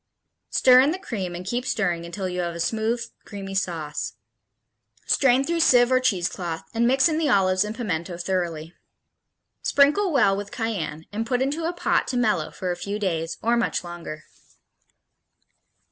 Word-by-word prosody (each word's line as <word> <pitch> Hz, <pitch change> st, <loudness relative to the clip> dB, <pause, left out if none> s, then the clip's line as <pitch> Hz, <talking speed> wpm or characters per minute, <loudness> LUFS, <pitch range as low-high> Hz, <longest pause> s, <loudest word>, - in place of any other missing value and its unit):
Stir 255 Hz, -1 st, +6 dB
in 270 Hz, +3 st, +5 dB
the 345 Hz, -, -1 dB
cream 195 Hz, -, -5 dB
and 180 Hz, +1 st, -7 dB
keep 240 Hz, +6 st, -2 dB
stirring 180 Hz, -9 st, -1 dB
until 190 Hz, +2 st, -4 dB
you 180 Hz, 0 st, -4 dB
have 170 Hz, -1 st, -2 dB
a -, -, -6 dB
smooth, 225 Hz, +6 st, 0 dB, 0.2 s
creamy 195 Hz, -2 st, -7 dB
sauce. 165 Hz, -6 st, -3 dB, 0.9 s
Strain 265 Hz, -1 st, +3 dB
through 335 Hz, +3 st, -1 dB
sieve 245 Hz, -5 st, +5 dB
or 255 Hz, -, +5 dB
cheesecloth, 175 Hz, -7 st, -1 dB
and 235 Hz, +1 st, +2 dB
mix 265 Hz, +3 st, +4 dB
in 315 Hz, -1 st, 0 dB
the 310 Hz, -3 st, +1 dB
olives 185 Hz, -3 st, +3 dB
and 210 Hz, +1 st, -5 dB
pimiento 180 Hz, -7 st, -3 dB
thoroughly. 170 Hz, -3 st, -3 dB, 0.9 s
Sprinkle 300 Hz, +8 st, +3 dB
well 245 Hz, -9 st, +4 dB
with 200 Hz, 0 st, -5 dB
cayenne 215 Hz, -10 st, -3 dB
and 225 Hz, +2 st, -3 dB
put 250 Hz, 0 st, +1 dB
into 290 Hz, +5 st, -1 dB
a 335 Hz, -, 0 dB
pot 350 Hz, -, +1 dB
to 250 Hz, -, -2 dB
mellow 215 Hz, -10 st, +1 dB
for 185 Hz, -1 st, -4 dB
a -, -, -2 dB
few 200 Hz, +3 st, -4 dB
days, 165 Hz, -5 st, -2 dB
or 235 Hz, +2 st, +3 dB
much 235 Hz, -, 0 dB
longer. 170 Hz, -3 st, -8 dB
205 Hz, 170 wpm, -24 LUFS, 175-250 Hz, 0.9 s, Stir